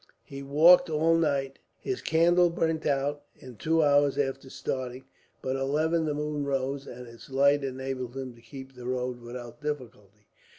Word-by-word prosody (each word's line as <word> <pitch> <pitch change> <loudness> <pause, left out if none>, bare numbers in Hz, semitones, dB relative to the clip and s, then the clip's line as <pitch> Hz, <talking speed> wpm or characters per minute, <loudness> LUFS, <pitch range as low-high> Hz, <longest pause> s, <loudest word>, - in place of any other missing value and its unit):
He 140 0 -9
walked 160 +6 +6
all 160 +2 +3
night. 140 -4 0 0.2
His 390 - -4
candle 175 +2 +4
burnt 160 -1 -1
out, 145 +1 0
in 130 -2 -12
two 160 +6 +2
hours 145 -1 +3
after 135 -1 -2
starting; 130 0 -5 0.4
but 130 0 -1
at 135 - -3
eleven 160 +4 +1
the 150 -1 -1
moon 150 0 -2
rose, 135 0 -2
and 125 0 -9
its 115 +2 -13
light 140 +1 +3
enabled 130 -1 -4
him 130 -2 -5
to 115 - -19
keep 135 +1 -11
the 125 -1 -9
road 125 -1 -2
without 120 +2 -9
difficulty. 110 -8 -6
135 Hz, 170 wpm, -28 LUFS, 130-150 Hz, 0.4 s, walked